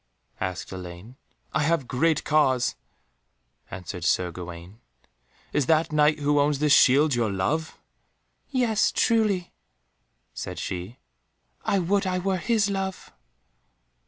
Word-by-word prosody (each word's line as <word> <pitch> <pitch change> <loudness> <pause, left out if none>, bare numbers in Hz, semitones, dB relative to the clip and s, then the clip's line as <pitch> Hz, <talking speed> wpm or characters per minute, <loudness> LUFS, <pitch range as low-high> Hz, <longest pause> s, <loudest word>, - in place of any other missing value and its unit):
asked 95 -2 -4
Elaine. 90 +5 -9 0.4
"I - - +1
have 150 -3 +1
great 155 +4 +1
cause," 130 -5 +2 1.0
answered 90 -1 -7
Sir 90 +2 +1
Gawaine. 85 +3 -9 0.7
"Is 145 -3 +1
that 160 0 +2
Knight 150 0 +3
who 145 0 +2
owns 145 0 +2
this 150 0 +3
shield 140 +3 +5
your 115 -3 0
love?" 150 +13 -2 0.7
"Yes, 240 -6 +2
truly," 215 -6 +1 0.8
said - - -6
she; 95 +6 -5 0.7
"I 200 - +1
would 195 +2 +1
I 185 0 0
were 190 +1 0
his 215 +2 +1
love." 195 -1 -4
150 Hz, 120 wpm, -25 LUFS, -, 1.0 s, shield